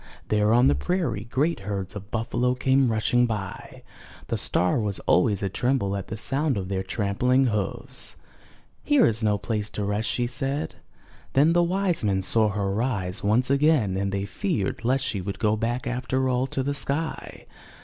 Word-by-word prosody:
There 105 0 +2
on 120 +2 +5
the - - +5
prairie 110 - -1
great 150 +8 0
herds 100 0 -5
of 105 0 -8
buffalo 120 +3 0
came 130 0 +2
rushing 120 +3 +2
by; 105 -5 -6 0.5
the - - 0
star 90 +6 +2
was 105 -3 -1
always 100 +2 +2
a - - +1
tremble 100 -1 0
at 100 -1 -5
the 110 - -5
sound 135 +2 0
of 95 -1 -4
their 95 -1 -1
trampling 110 +7 +1
hoofs. 120 +3 -2 0.7
Here 290 -3 +4
is 110 0 +1
no 105 -2 +2
place 105 +1 -3
to 105 - -4
rest," 105 +2 -1
she 120 - 0
said. 135 +4 -3 0.6
Then 150 +5 +4
the 175 - +4
wise 180 -2 0
men 95 -2 +1
saw 110 +2 +4
her 100 -1 -1
rise 100 -5 -2
once 120 +6 +2
again 140 -9 +3
and 100 0 -1
they 100 0 -2
feared 115 - -2
lest 130 +3 +1
she 105 -7 -2
would 95 +1 -5
go 105 +1 +1
back 120 +3 -2
after 130 +1 -1
all 130 +1 +1
to 135 - -2
the 145 +2 -1
sky. 145 +3 -4
115 Hz, 180 wpm, -25 LUFS, 100-130 Hz, 0.7 s, on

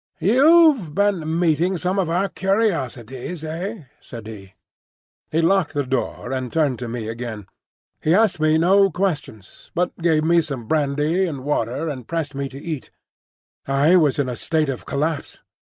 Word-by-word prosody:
"You've 260 - +4
been 175 -6 +1
meeting 175 +2 +2
some 185 +3 -1
of 180 -4 0
our 180 +4 +1
curiosities, 165 - -2
eh?" 175 +5 -5 0.2
said 115 -3 -10
he. 100 -4 -10 0.7
He 160 - +1
locked 190 -2 +2
the 145 - +1
door 125 -1 -3
and 130 -2 -3
turned 145 -6 +1
to 125 - -5
me 115 -2 -4
again. 115 -2 -6 0.6
He 160 +3 +3
asked 215 -5 +3
me 155 0 +3
no 195 +4 +4
questions, 155 - -4
but 180 +1 0
gave 160 -2 +2
me 170 +1 +4
some 140 -6 -5
more 110 - -14
brandy 150 +4 +1
and 140 -6 -5
water 140 +1 -1
and 130 -6 -6
pressed 160 -3 -3
me 140 0 -3
to 135 - -10
eat. 155 -3 -5 0.8
I 140 +6 +4
was 155 -5 +3
in 140 -2 0
a 125 - -3
state 155 +3 0
of 130 - -5
collapse. 150 +1 -3
155 Hz, 170 wpm, -22 LUFS, 135-180 Hz, 0.8 s, You've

